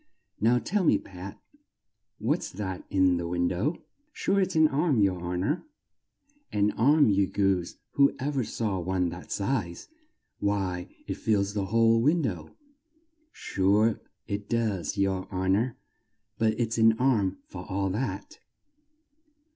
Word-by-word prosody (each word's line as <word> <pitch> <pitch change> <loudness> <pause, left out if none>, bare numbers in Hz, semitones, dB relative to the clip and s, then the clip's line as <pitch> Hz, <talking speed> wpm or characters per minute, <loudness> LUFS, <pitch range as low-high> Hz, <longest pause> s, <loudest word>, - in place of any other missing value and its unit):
Now, 115 +3 +4
tell 195 +10 0
me, - - +4
Pat, 95 +1 -10 0.8
what's 140 +11 -1
that 95 -2 -5
in 95 -2 +3
the 85 0 -3
win 85 0 0
dow?" 115 - -1 0.3
"Sure 200 -8 +1
it's 190 -2 -1
an 155 0 +6
arm, 140 -6 +2
yer 95 -1 +3
hon 90 +1 -3
or" 150 - -1 0.9
"An 105 0 +2
arm, 145 +3 +4
you 100 -1 +2
goose! 95 -3 0 0.2
Who 140 0 +3
ever 140 -1 -1
saw 105 -4 -2
one 90 0 0
that 85 +2 -9
size? 100 -5 -2 0.5
Why, 95 -3 -1 0.2
it - - -4
fills 100 -2 0
the 100 -2 -1
whole 115 +3 +3
win 155 +6 +3
dow!" 90 - -3 0.8
"Sure 105 +4 +1 0.3
it 100 0 -4
does, 110 -5 -1
yer 95 -1 0
hon 95 0 +1
or; 115 +3 -1 0.6
but 110 -1 +1
it's 115 -1 0
an 110 0 +6
arm 110 -7 +2
for 90 -1 -9
all 95 0 -1
that." 130 - -4
105 Hz, 145 wpm, -27 LUFS, 95-120 Hz, 0.9 s, an